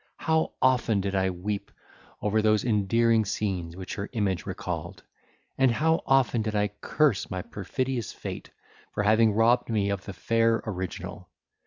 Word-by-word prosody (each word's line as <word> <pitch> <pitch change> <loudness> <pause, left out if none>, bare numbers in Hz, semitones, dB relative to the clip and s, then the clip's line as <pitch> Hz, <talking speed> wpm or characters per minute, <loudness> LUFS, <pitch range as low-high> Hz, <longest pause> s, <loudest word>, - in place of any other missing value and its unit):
how 160 0 +1
often 125 -5 +3
did 100 0 -2
I 95 -1 +2
weep 100 +3 -4 0.5
over 105 +1 +2
those 110 0 +2
endearing 115 +1 +3
scenes 95 -5 -3
which 95 0 -6
her 100 0 -5
image 100 -5 -1
recalled! - - -5 0.6
and 135 -1 +5
how 160 +7 +2
often 130 -4 +3
did 110 0 -2
I 105 0 +2
curse 120 +3 0
my 90 -1 -4
perfidious 125 +3 -3
fate - - -7 0.5
for 105 - 0
having 110 +1 +4
robbed 120 +3 +3
me 100 -3 +1
of 100 -1 -4
the 100 - -6
fair 115 +4 +1
original! 95 -4 -5
110 Hz, 155 wpm, -27 LUFS, 100-115 Hz, 0.6 s, and